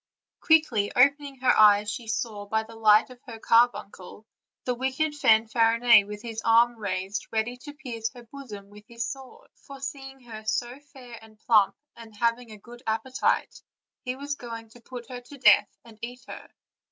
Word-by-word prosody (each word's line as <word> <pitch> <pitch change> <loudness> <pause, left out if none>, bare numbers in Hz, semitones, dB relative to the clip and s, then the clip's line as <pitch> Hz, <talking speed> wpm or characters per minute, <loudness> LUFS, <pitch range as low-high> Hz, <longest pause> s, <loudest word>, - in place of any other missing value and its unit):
Quickly 310 - +2
opening 280 +2 +3
her 260 - +4
eyes 210 -1 +5
she 230 +1 -7
saw, 220 -2 -4
by 220 +1 0
the 225 +1 -14
light 215 +1 +4
of 250 -1 -15
her 230 -2 -8
carbuncle, 220 -4 0 0.4
the 250 - -1
wicked 265 +5 -2
Fanfarinet, 230 -3 +4
with 210 0 -8
his 225 -1 -6
arm 235 +1 +4
raised 195 -2 -4
ready 225 +2 -1
to 290 +3 -11
pierce 235 -6 -5
her 240 - -12
bosom 225 -6 -11
with 210 0 -14
his 235 0 -5
sword; 270 - -12
for, 275 -1 -13
seeing 270 0 -7
her 225 -3 -10
so 240 +4 -3
fair 245 -4 -12
and 220 -1 -18
plump, 205 -4 +3 0.2
and 225 -2 -14
having 235 +2 -1
a 215 - -11
good 240 +4 -14
appetite, 225 +4 -1 0.4
he 250 0 -4
was 285 +2 -5
going 230 -4 -9
to 240 +2 -18
put 245 0 -10
her 250 -1 -8
to 265 +4 -14
death 260 - +5 0.2
and 225 -2 -16
eat 245 +2 -8
her. - - -10
235 Hz, 175 wpm, -26 LUFS, 220-255 Hz, 0.4 s, eyes